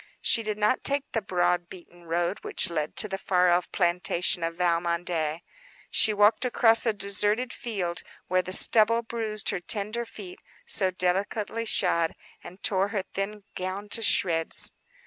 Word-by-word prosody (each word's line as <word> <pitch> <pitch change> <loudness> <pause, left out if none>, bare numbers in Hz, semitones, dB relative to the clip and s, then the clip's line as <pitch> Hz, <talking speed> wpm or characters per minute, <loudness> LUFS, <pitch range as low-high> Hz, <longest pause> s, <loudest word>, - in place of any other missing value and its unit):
She 230 - +3
did 215 -1 -3
not 210 +4 +1
take 280 0 -1
the 225 - -1
broad, 175 -2 -1
beaten 175 -1 -14
road 175 +3 -2
which - - -1
led 155 -2 -3
to 215 - +2
the 195 -1 -5
far 180 -2 +2
off 175 +1 0
plantation 175 -1 0
of 165 0 -3
Valmondé. 170 -2 -1 0.5
She 220 - +5
walked 210 +2 +3
across 235 -2 +4
a - - +4
deserted 205 +4 0
field, 185 -7 -4 0.3
where 185 0 +1
the 185 - -8
stubble 230 +4 +5
bruised 220 -2 -1
her - - -1
tender 210 +5 -2
feet, 205 -5 -10 0.3
so 195 -4 +1
delicately 200 +5 -2
shod, 170 -5 +1 0.3
and 185 +3 -13
tore 195 -1 +2
her 205 -2 -3
thin 200 +2 -6
gown 190 +3 -5
to 225 - -2
shreds. 165 -6 +2
195 Hz, 160 wpm, -26 LUFS, 175-215 Hz, 0.5 s, She